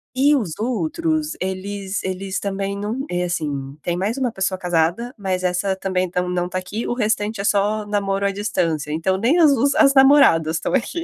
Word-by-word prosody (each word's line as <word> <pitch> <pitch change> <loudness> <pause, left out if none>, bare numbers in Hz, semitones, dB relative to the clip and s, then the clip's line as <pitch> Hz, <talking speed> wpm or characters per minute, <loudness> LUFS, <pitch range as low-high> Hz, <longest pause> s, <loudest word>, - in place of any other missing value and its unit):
E 285 +3 +4
os 210 - -2
outros, 300 - -1
eles 190 +1 -4
eles 190 +1 -3
também 200 0 -3
não 215 +7 -3
É, 180 0 0
assim, 145 -5 -4
tem 175 - -1
mais 200 +7 -2
uma 255 -3 0
pessoa 190 -2 -1
casada, 175 +7 0
mas 190 -3 -2
essa 180 +2 0
também 185 -1 -1
tão 180 +1 -1
não 180 0 -1
está 185 +1 -4
aqui. 205 +5 -4
O - - -1
restante 215 -2 -1
é - - -2
só 205 +1 +1
namoro 200 -1 -1
à 200 - +2
distância, 165 -7 -2
então 165 +5 0
nem 260 - +2
os 280 -2 +4
as 275 -2 +5
namoradas 265 - +5
estão 160 - -3
aqui. 275 +6 -1
195 Hz, 190 wpm, -21 LUFS, 180-235 Hz, -, as